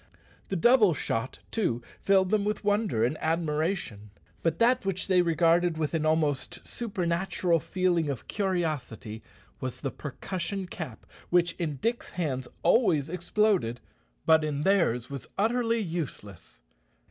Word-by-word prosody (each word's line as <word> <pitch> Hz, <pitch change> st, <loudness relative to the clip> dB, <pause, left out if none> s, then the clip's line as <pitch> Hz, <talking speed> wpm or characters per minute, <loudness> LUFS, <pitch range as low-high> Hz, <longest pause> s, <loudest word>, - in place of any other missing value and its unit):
The 195 Hz, -, -1 dB
double 210 Hz, -, +5 dB
shot, 115 Hz, -1 st, -2 dB
too, 125 Hz, -, 0 dB, 0.2 s
filled 190 Hz, -2 st, +3 dB
them 215 Hz, -2 st, +3 dB
with 210 Hz, +1 st, -2 dB
wonder 205 Hz, -, +1 dB
and 130 Hz, +6 st, -2 dB
admiration; 160 Hz, -, -1 dB, 0.3 s
but 165 Hz, -1 st, 0 dB
that 245 Hz, +2 st, +3 dB
which 195 Hz, -1 st, -2 dB
they 185 Hz, -2 st, +4 dB
regarded 170 Hz, 0 st, +3 dB
with 155 Hz, -1 st, -1 dB
an 155 Hz, -1 st, +1 dB
almost 155 Hz, +1 st, 0 dB
supernatural 180 Hz, -4 st, 0 dB
feeling 175 Hz, -3 st, 0 dB
of 135 Hz, -5 st, -5 dB
curiosity 155 Hz, -, -2 dB, 0.4 s
was 130 Hz, -2 st, -5 dB
the 135 Hz, -, -2 dB
percussion 185 Hz, +6 st, -4 dB
cap, 160 Hz, -9 st, -7 dB, 0.2 s
which, 175 Hz, -1 st, +3 dB
in 160 Hz, -4 st, -1 dB
Dick's 230 Hz, -, -2 dB
hands, 130 Hz, -7 st, -2 dB, 0.2 s
always 160 Hz, -, +3 dB
exploded, 180 Hz, -, +1 dB, 0.5 s
but 160 Hz, -1 st, +5 dB
in 145 Hz, -2 st, -2 dB
theirs 155 Hz, -, +2 dB
was 140 Hz, -2 st, -6 dB
utterly 230 Hz, +2 st, +2 dB
useless! 160 Hz, -, -5 dB
170 Hz, 135 wpm, -28 LUFS, 145-195 Hz, 0.5 s, double